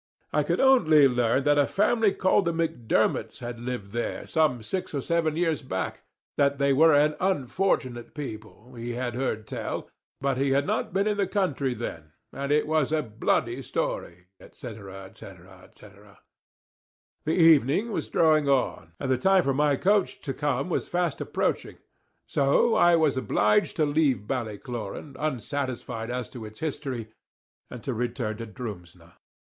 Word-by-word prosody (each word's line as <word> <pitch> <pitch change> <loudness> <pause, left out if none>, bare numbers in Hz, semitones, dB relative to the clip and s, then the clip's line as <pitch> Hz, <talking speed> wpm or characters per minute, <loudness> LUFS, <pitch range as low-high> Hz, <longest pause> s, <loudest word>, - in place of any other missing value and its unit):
I - - +3
could - - -1
only 160 - +6
learn 125 +1 +1
that 145 0 +3
a 145 - +3
family 215 +1 +2
called 190 +1 +2
the 170 - 0
Macdermots 115 -8 0
had 120 -2 -7
lived 120 -5 -5
there 120 +2 -3
some 150 -8 +1
six 185 - -4
or 140 - -1
seven 165 0 0
years 165 -3 0
back, 95 -9 -4 0.4
that 140 0 +2
they 140 0 +2
were 160 +2 +6
an 150 +1 +3
unfortunate 135 -8 -1
people, 120 -3 -8
he 120 0 -5
had 125 -1 -3
heard 120 -4 -2
tell, - - -5 0.3
but 135 -1 0
he 135 0 +1
had 140 +1 +2
not - - -1
been 195 +2 +1
in 210 -1 0
the 200 -2 +1
country 145 -10 -1
then, 80 -9 -7 0.2
and 140 +1 -3
it 150 0 +3
was 155 -2 +1
a 155 -1 +1
bloody 110 -3 -1
story, 90 +1 -4
&c. - - -14 0.2
&c. 95 -2 -11 0.4
&c. - - -15 1.4
The 155 - +1
evening 165 - +4
was - - -3
drawing 155 -3 +3
on, 125 -11 0
and 135 - -2
the 130 - +2
time 190 +5 +4
for 135 - +1
my 145 +1 +2
coach 200 +6 +1
to 135 - -4
come 140 -1 -1
was 180 - -2
fast 175 -3 -1
approaching; - - -2 0.5
so 140 +12 +2
I 175 -6 +5
was 155 -5 +2
obliged 130 - +2
to 155 - +2
leave 145 -8 +1
Ballycloran, 120 +3 -5
unsatisfied 130 -4 -3
as 125 -2 -3
to 120 - -9
its 110 0 -10
history, 135 -7 -4 0.6
and 125 - -9
to 135 - -2
return 120 -2 -3
to 115 0 -6
Drumsna. 90 -7 -9
135 Hz, 165 wpm, -26 LUFS, 120-160 Hz, 1.4 s, only